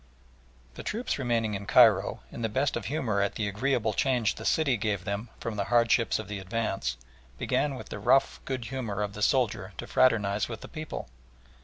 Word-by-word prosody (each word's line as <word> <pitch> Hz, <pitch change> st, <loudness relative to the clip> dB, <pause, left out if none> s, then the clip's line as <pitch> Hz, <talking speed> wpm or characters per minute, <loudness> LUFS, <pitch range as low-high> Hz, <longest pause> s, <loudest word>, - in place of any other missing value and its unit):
The -, -, -8 dB
troops 225 Hz, -, -2 dB
remaining 115 Hz, -4 st, 0 dB
in 100 Hz, 0 st, -5 dB
Cairo, -, -, +5 dB
in -, -, -7 dB
the 110 Hz, -, 0 dB
best 135 Hz, +6 st, 0 dB
of 120 Hz, -, -4 dB
humour 115 Hz, -6 st, 0 dB
at 100 Hz, -, 0 dB
the 110 Hz, -, -1 dB
agreeable 110 Hz, +1 st, 0 dB
change 125 Hz, -2 st, +1 dB
the -, -, -9 dB
city 150 Hz, -5 st, +2 dB
gave 105 Hz, -4 st, -1 dB
them 100 Hz, +3 st, -3 dB
from 110 Hz, -2 st, -4 dB
the 100 Hz, -, 0 dB
hardships 115 Hz, 0 st, +3 dB
of 110 Hz, -, -6 dB
the 105 Hz, -1 st, -5 dB
advance, 95 Hz, -, -2 dB, 0.4 s
began 145 Hz, -, 0 dB
with -, -, -9 dB
the -, -, -6 dB
rough 135 Hz, 0 st, +3 dB
good 130 Hz, -3 st, -3 dB
humour 115 Hz, -6 st, -3 dB
of 100 Hz, -1 st, -4 dB
the 105 Hz, -, -7 dB
soldier 110 Hz, -5 st, +1 dB
to -, -, -5 dB
fraternise 105 Hz, -5 st, +2 dB
with 115 Hz, -2 st, -6 dB
the -, -, -8 dB
people. 155 Hz, -, -6 dB
115 Hz, 195 wpm, -28 LUFS, 100-130 Hz, 0.4 s, Cairo